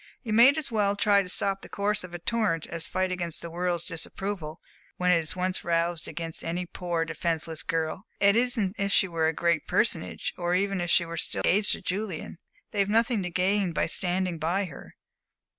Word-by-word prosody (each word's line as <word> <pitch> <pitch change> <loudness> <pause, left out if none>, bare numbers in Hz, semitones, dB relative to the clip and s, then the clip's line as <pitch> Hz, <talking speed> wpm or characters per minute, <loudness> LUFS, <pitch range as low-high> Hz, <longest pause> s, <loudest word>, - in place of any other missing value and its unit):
"You 220 -4 -3
might 250 +7 +7
as 305 -5 -3
well 205 -2 +2
try 200 0 +4
to 185 - -6
stop 195 +1 +1
the - - -11
course 205 0 -1
of 175 -1 -8
a - - -3
torrent 185 -3 0
as 165 -1 -2
fight 185 0 -1
against 170 -3 0
the 170 - -6
world's 175 0 -1
disapproval, 165 -1 -3 0.4
when 180 0 +2
it 175 - +5
is 160 +1 -1
once 185 0 -1
roused 170 -1 +1
against 165 0 -5
any 175 +2 -2
poor, 175 -2 -2
defenceless 165 -1 -2
girl. 165 +4 -2
And 200 0 +5
it - - +5
isn't 230 -5 0
as 200 - +1
if - - -2
she 190 - +4
were 165 -2 0
a - - +3
great 170 -1 0
personage, - - 0
or 175 0 +1
even 195 0 0
as - - -1
if - - -5
she 170 - +4
were 165 0 -6
still - - -2
engaged 205 +3 +3
to - - -5
Julian! 185 -4 -4 0.3
They've 200 -1 +1
nothing 225 0 +2
to 180 - -3
gain 185 +1 +1
by - - +1
standing 180 -1 -1
by 175 +6 0
her. 155 -7 -11
180 Hz, 215 wpm, -27 LUFS, 165-200 Hz, 0.4 s, might